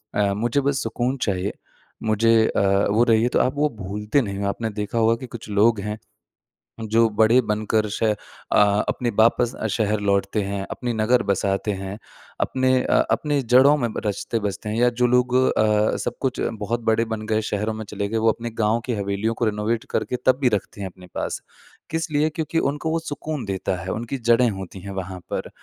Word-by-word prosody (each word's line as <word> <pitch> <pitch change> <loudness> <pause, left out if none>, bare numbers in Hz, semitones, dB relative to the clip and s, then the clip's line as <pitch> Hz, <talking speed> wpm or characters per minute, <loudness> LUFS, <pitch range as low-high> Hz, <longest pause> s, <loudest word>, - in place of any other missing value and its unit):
अ, 100 -1 +2
मुझे 120 +7 0
बस 140 0 0
सुकून 120 +3 -1
चाहिए, 95 -2 -1 0.5
मुझे 110 +1 +3
अ, - - 0 0.3
वो 110 +3 +4
रही 110 -2 +4
है 120 - +2
तो - - +1
आप 130 - +2
वो 150 +1 +2
भूलते 105 +8 0
नहीं 100 -5 -4
हो। 100 - -2
आपने 110 +3 -3
देखा 105 +2 -4
होगा 115 0 +4
कि 125 +2 -8
कुछ 120 -3 -9
लोग 105 +2 +3
हैं, 105 +1 -4 0.9
जो 115 +1 +4
बड़े 110 +3 +4
बनकर 110 -1 0
श 100 - -3
अ, 110 -1 +3 0.7
अपने 120 - -1
वापस 115 +2 +4
अ, 110 - -3
शहर 105 0 0
लौटते 100 +1 +1
हैं, 100 0 -3
अपने 120 -1 -3
नगर 115 +3 +2
बसाते 100 +1 0
हैं, 95 0 -5 0.4
अपने 130 0 +1
अ, - - +3
अपने 145 -2 +1
जड़ों 130 +4 +5
में 120 -5 -1
ब - - -4
रचते-बसते 105 -1 -2
हैं 110 - -2
या 120 +1 +4
जो 125 - +5
लोग 125 +1 +2
अ, 110 -4 +3
सब - - -4
कुछ 130 -2 -1 0.2
बहुत 115 +3 -1
बड़े 115 +1 +2
बन 110 -1 -4
गए 110 0 +1
शहरों 105 +2 -1
में 110 0 -6
चले 100 0 -3
गए, 115 - -1
वो 110 0 +3
अपने 120 +2 -5
गाँव 110 +1 +2
की 125 - -1
हवेलियों 100 +2 -1
को 120 - 0
रेनोवेट 110 +1 -1
करके - - -1
तब 130 0 +4
भी 125 - +4
रखते 100 0 -6
हैं 95 - -3
अपने 90 0 -15
पास। - - -3 0.5
किस 165 0 -2
लिए? 150 +1 +2
क्योंकि 160 +1 -2
उनको 150 +2 -1
वो 165 - +1
सुकून 150 -4 -5
देता 95 -1 -2
है, 95 - -6
उनकी 120 +5 -4
जड़ें 120 0 +3
होती 95 -1 -7
हैं 100 - -7
वहाँ 95 -1 -5
पर। - - -3
110 Hz, 205 wpm, -23 LUFS, 105-125 Hz, 0.9 s, जड़ों